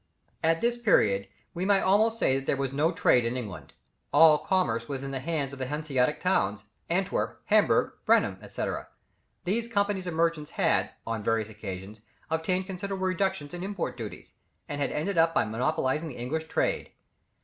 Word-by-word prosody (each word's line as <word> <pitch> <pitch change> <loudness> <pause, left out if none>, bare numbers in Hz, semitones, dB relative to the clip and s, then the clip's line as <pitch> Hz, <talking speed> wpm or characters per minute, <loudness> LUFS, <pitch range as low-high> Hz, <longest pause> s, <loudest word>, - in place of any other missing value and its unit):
At 165 0 +2
this 240 0 +1
period, 100 - +3 0.3
we 175 - -3
may 195 0 +4
almost 215 +4 +3
say 135 -10 +2
there 135 - -1
was 135 -1 -2
no 150 +4 +2
trade 125 -7 +3
in 115 +2 -1
England. 105 -7 -7 0.4
All 155 -2 +7
commerce 150 -11 0
was 135 -1 -4
in 135 - -4
the 135 - -3
hands 140 -1 -2
of 140 - -9
the 130 - -2
Hanseatic 145 -2 0
towns, 105 - +1 0.3
Antwerp, 185 +3 -1
Hamburg, - - +3
Bremen, - - +3
&c. - - -4 0.8
These 225 +6 -1
companies 200 -4 0
of 170 - -3
merchants 165 -2 +1
had, - - +1 0.2
on 115 -1 -2
various 110 0 0
occasions, 105 0 -8 0.3
obtained 180 +4 0
considerable 190 0 -4
reductions 185 -5 -1
in 175 - -5
import 195 -2 -3
duties, - - -8 0.3
and 145 0 -4
had 140 - 0
ended 170 +4 -1 0.2
by - - +3
monopolizing 135 +6 0
the 130 - -9
English 160 +7 -3
trade. - - 0
155 Hz, 170 wpm, -28 LUFS, 130-185 Hz, 0.8 s, All